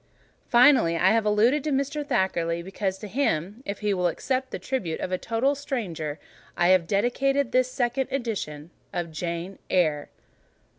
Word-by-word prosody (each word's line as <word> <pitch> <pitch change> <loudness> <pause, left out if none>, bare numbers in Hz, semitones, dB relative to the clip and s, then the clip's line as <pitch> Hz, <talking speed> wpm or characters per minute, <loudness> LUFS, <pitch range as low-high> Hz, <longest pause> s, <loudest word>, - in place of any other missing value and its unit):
Finally, 240 - +5
I 185 +4 +4
have 225 -1 +2
alluded 230 +7 +3
to 310 - -1
Mr. 280 +2 -1
Thackeray, 170 -8 0
because 190 +1 -3
to 210 - -8
him—if 205 - -2
he 210 -1 +1
will 180 -2 +1
accept 260 +8 -2
the - - -4
tribute 195 -12 -3
of 185 - -4
a 185 - 0
total 230 +5 +1
stranger—I 175 - -3
have 185 -3 +4
dedicated 255 +6 +1
this 255 0 +3
second 250 +1 -1
edition 190 - -4 0.2
of 175 -2 -3
"JANE 170 +3 -4
EYRE." 155 -5 +1
205 Hz, 150 wpm, -26 LUFS, 175-255 Hz, 0.2 s, Finally